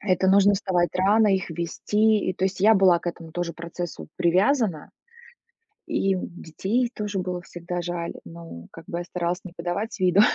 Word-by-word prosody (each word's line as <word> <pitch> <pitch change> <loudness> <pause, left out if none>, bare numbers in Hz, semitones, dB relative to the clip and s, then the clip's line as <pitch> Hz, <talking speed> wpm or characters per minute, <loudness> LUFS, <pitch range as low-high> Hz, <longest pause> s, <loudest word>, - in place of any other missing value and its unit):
Это 190 -2 +1
нужно 200 +1 +5
вставать 180 -3 +1
рано, 210 +4 +4
их 190 -3 0
вести. 210 +6 +1
И - - +1
то 185 - -2
есть 190 -1 -2
я 220 +3 +6
была 185 -3 +5
к - - -13
этому 165 -2 -5
тоже 175 0 -3
процессу 170 +1 -7
привязана. 185 - +2 1.0
И 195 0 +1
детей 190 +7 -2
тоже 210 -2 -3
было 180 -1 -3
всегда 175 +1 -5
жаль. 175 -1 -4
Ну, 165 - -10
как 165 - -12
бы 170 - -3
я - - -4
старалась 175 0 -2
не 185 - -9
подавать 185 +5 -3
виду, 185 +2 +5
180 Hz, 175 wpm, -25 LUFS, 170-200 Hz, 1.0 s, я